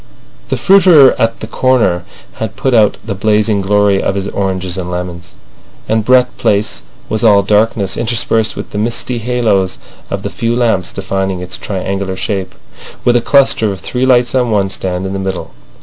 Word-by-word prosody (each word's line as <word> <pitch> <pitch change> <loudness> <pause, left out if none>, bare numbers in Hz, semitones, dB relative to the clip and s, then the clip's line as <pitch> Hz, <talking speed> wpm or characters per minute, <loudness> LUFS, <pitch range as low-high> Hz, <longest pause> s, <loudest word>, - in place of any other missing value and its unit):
The - - -1
fruiterer 180 -8 +6
at 115 0 0
the - - -4
corner 110 -8 +1 0.3
had 110 -1 -4
put 135 0 -1
out 110 -3 +3
the 115 - -3
blazing 105 +1 +1
glory 100 0 +2
of 95 - -1
his 100 0 -2
oranges 95 -2 -2
and 90 -2 -4
lemons, 90 -1 -6 0.5
and 110 0 +1
Brett 125 +1 +3
Place 105 +1 0 0.3
was 110 +2 -2
all 100 -3 +5
darkness, 105 -1 +1
interspersed 115 -1 0
with - - -7
the 105 - -3
misty 120 +2 -2
halos 110 -6 0 0.3
of - - -4
the - - -4
few 115 +1 -1
lamps 115 -7 0
defining 95 -1 -3
its 90 0 -6
triangular 95 -1 -4
shape, 95 -3 -3 0.5
with 120 - +4
a 120 - +3
cluster 130 -5 +3
of 95 - -6
three 130 +1 -2
lights 125 -2 +3
on 125 -2 +1
one 100 -3 0
stand 95 -1 -3
in 95 - -4
the 95 - -3
middle. 95 -1 -4
105 Hz, 180 wpm, -14 LUFS, 95-120 Hz, 0.5 s, fruiterer